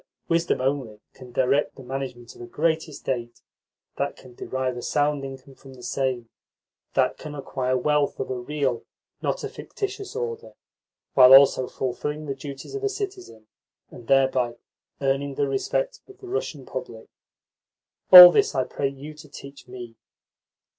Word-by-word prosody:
Wisdom 165 0 +1
only 130 -5 -2
can 130 -2 -13
direct 135 +4 +1
the 135 - -12
management 125 -2 -6
of - - -15
a 120 - -8
great 160 +5 -1
estate, 120 -5 -5 0.5
that 140 0 -2
can 130 -2 -16
derive 130 +1 -3
a 120 - -6
sound 145 0 0
income 135 0 -9
from 135 0 -15
the 125 - -14
same, 125 -1 -2 0.7
that - - +1
can 150 -1 -8
acquire 130 -2 -2
wealth 150 +2 0
of - - -4
a 125 - -3
real, 130 -2 -2 0.4
not - - -2
a - - -2
fictitious, 405 +1 -6
order 465 0 -5 0.6
while 130 0 +9
also 135 -2 +5
fulfilling 150 +5 -4
the 140 - -3
duties 135 - -9
of 410 0 -5
a 410 - +1
citizen 385 - -7 0.5
and 120 - -13
thereby 130 -3 +2 0.5
earning 135 0 -1
the 140 - 0
respect 475 - -2
of 390 -1 -16
the 385 - -12
Russian 420 +6 -4
public. - - -8 1.0
All 180 -1 +13
this 160 - +1
I 130 - +2
pray 140 - -3
you 140 +3 -10
to 150 0 -15
teach 140 -1 -12
me." 120 -2 -10
135 Hz, 160 wpm, -24 LUFS, 130-150 Hz, 1.0 s, All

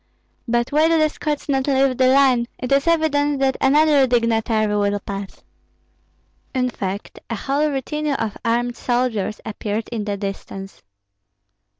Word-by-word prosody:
But 240 +2 0
why 305 +2 +4
do 330 0 +3
the 310 -1 +3
Scots 300 -1 -4
not 270 -1 0
leave 270 -1 +2
the 255 +1 +3
line? 260 -3 +4
It 250 - -5
is 275 +3 +3
evident 295 -3 +2
that 265 -1 +2
another 290 0 +4
dignitary 225 -3 +1
will 205 0 +1
pass." 200 -1 -7 1.1
In 250 -1 +1
fact, 195 -2 -5
a 230 - -2
whole 285 +7 0
retinue 295 +2 -2
of 225 -4 -3
armed 240 +1 0
soldiers 240 -4 -1
appeared 215 0 -3
in 225 -3 -4
the 205 -1 -2
distance. 195 -1 -7
250 Hz, 150 wpm, -21 LUFS, 215-280 Hz, 1.1 s, why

